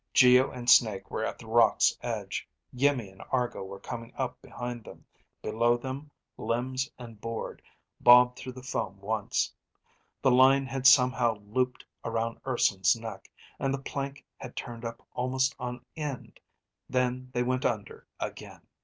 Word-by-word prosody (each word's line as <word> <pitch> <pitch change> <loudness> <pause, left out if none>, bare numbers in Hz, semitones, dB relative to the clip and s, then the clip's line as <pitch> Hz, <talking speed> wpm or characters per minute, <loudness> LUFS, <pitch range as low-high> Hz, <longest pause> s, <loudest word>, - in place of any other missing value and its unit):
Geo 125 0 +7
and 125 -1 -8
Snake 110 -6 +5
were 110 - -2
at - - -3
the 115 - -12
rocks' 115 0 +4
edge. - - -4 0.3
Iimmi 125 -6 +1
and 95 - -15
Argo 125 -5 0
were 95 +1 -8
coming 115 +2 -7
up 130 -2 -3
behind 120 -1 -6
them. - - -13 0.4
Below 120 +2 +2
them, 135 +4 -6 0.3
limbs 130 +3 -1
and 115 -4 -11
board 115 0 -5 0.4
bobbed 125 0 +7
through 130 - -7
the 130 0 -10
foam 110 -7 -3
once. 105 +1 -1 0.7
The 130 - +5
line 135 +2 +6
had 130 0 +1
somehow 125 -3 +5
looped 125 +4 -1 0.2
around 115 0 -2
Urson's 100 -7 +3
neck, 115 -1 -8 0.3
and 135 - 0
the 135 - 0
plank 140 0 -5
had 125 - -9
turned 120 -1 -6
up 115 0 -7
almost 130 +2 +1
on 125 0 -5
end. 150 -4 -5 0.5
Then 125 0 0
they 125 -1 0
went 130 +1 0
under 105 -4 -3
again. - - -6
125 Hz, 155 wpm, -29 LUFS, 115-130 Hz, 0.7 s, Geo